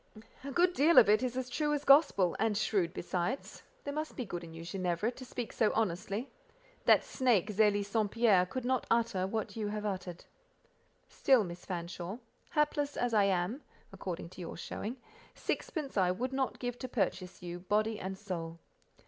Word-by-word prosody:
"A 280 - -5
good 350 +5 +3
deal 330 +2 +4
of 215 - +9
it 215 +3 +5
is 255 0 -2
true 295 +4 0
as 290 - -3
gospel, 275 - +5
and 220 -2 +1
shrewd 195 -5 +1
besides. 180 +8 -3 0.2
There 285 - -4
must 310 +1 -4
be 250 - -3
good 175 -3 -5
in 165 - -9
you, 165 0 -8
Ginevra, 185 +4 -1
to 255 - -10
speak 245 -2 -5
so 220 - +2
honestly; 210 +3 -1 0.5
that - - +6
snake, 225 -6 +1
Zélie 205 -1 +3
St. 210 0 0
Pierre, 205 -5 +4
could 255 +6 -4
not 255 -1 0
utter 225 -5 +1
what 220 +3 -3
you 215 -2 -2
have 210 0 -3
uttered. 185 -3 -4 0.8
Still, 260 -5 +3
Miss 175 -1 -8
Fanshawe, 175 +2 -5 0.3
hapless 295 -2 0
as 245 -1 0
I 205 -2 +5
am, 195 +7 0 0.3
according 170 -2 -5
to 185 - -11
your 170 - -6
showing, 225 +8 -5 0.4
sixpence 300 -5 -3
I 185 -3 +3
would 250 +8 -2
not 265 -1 -1
give 245 -1 -4
to 255 - -4
purchase 195 -6 -2
you, 175 0 -5
body 215 +4 0
and 190 +1 -5
soul." 170 -5 -5
215 Hz, 180 wpm, -32 LUFS, 185-255 Hz, 0.8 s, of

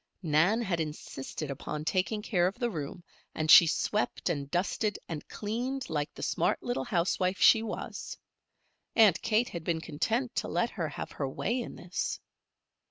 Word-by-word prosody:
Nan 175 +9 +3
had 175 -5 -1
insisted 150 -1 -5
upon 150 +2 -5
taking 195 +5 0
care 180 -6 +2
of 190 - -4
the 240 -1 -1
room, 165 +1 -5 0.3
and 155 -1 +2
she 170 - +10
swept 210 +6 0
and 140 -3 -2
dusted 195 +5 0
and 155 -3 -6
cleaned 250 +4 -3
like 150 -1 -1
the - - -7
smart - - 0
little 245 0 -2
housewife 185 0 0
she 225 - +7
was. 225 - -5 0.8
Aunt 210 -7 +6
Kate 230 +2 +2
had 170 -2 -6
been 165 -1 0
content 225 - -1
to - - 0
let 235 - 0
her 165 -6 -3
have - - -6
her 135 -2 -3
way 235 - -1
in - - -7
this. 175 +1 -3
180 Hz, 165 wpm, -30 LUFS, 155-220 Hz, 0.8 s, she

